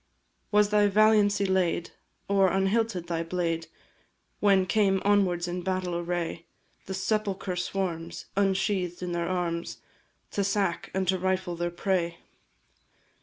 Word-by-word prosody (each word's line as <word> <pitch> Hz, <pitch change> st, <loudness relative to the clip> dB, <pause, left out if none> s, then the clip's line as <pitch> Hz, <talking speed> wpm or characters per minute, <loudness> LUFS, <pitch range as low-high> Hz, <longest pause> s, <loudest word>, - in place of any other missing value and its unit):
Was 210 Hz, -1 st, +4 dB
thy 210 Hz, -1 st, +4 dB
valiancy 205 Hz, -1 st, +4 dB
laid, 185 Hz, -3 st, 0 dB, 0.4 s
or 195 Hz, -1 st, +4 dB
unhilted 195 Hz, -1 st, +1 dB
thy 170 Hz, -1 st, -2 dB
blade, 165 Hz, -1 st, -2 dB, 0.7 s
When 195 Hz, -2 st, +4 dB
came 195 Hz, -1 st, +2 dB
onwards 185 Hz, -4 st, +2 dB
in 175 Hz, +1 st, -3 dB
battle 185 Hz, -1 st, -2 dB
array 170 Hz, -1 st, -3 dB, 0.4 s
The 190 Hz, -, -3 dB
sepulchre 195 Hz, -2 st, -1 dB
swarms, 175 Hz, -2 st, -3 dB
ensheathed 190 Hz, -2 st, 0 dB
in 180 Hz, -, -3 dB
their 170 Hz, 0 st, -1 dB
arms, 170 Hz, -2 st, -2 dB, 0.5 s
To 200 Hz, -, 0 dB
sack 195 Hz, -3 st, 0 dB
and 190 Hz, -1 st, 0 dB
to 185 Hz, +1 st, +2 dB
rifle 185 Hz, -1 st, -1 dB
their 175 Hz, +1 st, -2 dB
prey? 175 Hz, -1 st, -1 dB
185 Hz, 125 wpm, -27 LUFS, 175-200 Hz, 0.7 s, Was